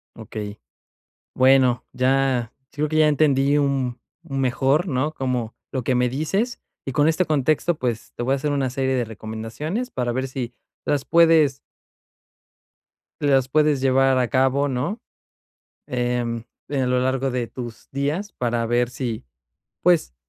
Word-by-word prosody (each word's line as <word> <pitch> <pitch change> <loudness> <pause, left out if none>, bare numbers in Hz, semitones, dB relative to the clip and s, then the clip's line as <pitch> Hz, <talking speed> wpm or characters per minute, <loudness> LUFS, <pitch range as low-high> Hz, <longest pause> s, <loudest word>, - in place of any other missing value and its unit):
Okey, 105 -2 -7 0.8
bueno, 130 -1 +4
ya 130 -2 +1 0.2
creo 150 +2 -1
que 155 - -1
ya 155 -1 +6
entendí, 145 -1 +3
un 135 -4 0 0.3
un 135 -1 -1
mejor, 135 +6 +2
¿no?, 140 +3 0
como 125 -5 -2 0.2
lo 130 -2 -2
que 130 - +2
me 125 0 +2
dices 195 - -1 0.3
y 135 - -3
con 145 +3 +3
este 160 +3 +3
contexto, 155 +3 +1
pues 120 -5 -3
te - - -3
voy 130 +2 +1
a - - +3
hacer 145 +2 -2
una 140 -2 0
serie 130 +1 -1
de 125 -2 0
recomendaciones 115 - -5
para 125 - -2
ver 130 +2 -2
si 125 -2 -5 0.3
las 145 -2 0
puedes 165 -4 +5 1.6
las 135 -3 +3
puedes 150 -1 +3
llevar 135 0 +3
a 125 -2 +1
cabo, 135 +2 +2
¿no? 140 - -2 0.9
Em, 120 -2 -1 0.3
en 135 -3 0
lo 125 0 +2
largo 130 +1 0
de 125 -1 -2
tus 120 -2 -9
días 150 +9 -2
para 120 -1 -1
ver 120 +1 +1
sí, 120 - -4 0.6
pues 170 - +3
130 Hz, 150 wpm, -23 LUFS, 125-145 Hz, 1.6 s, ya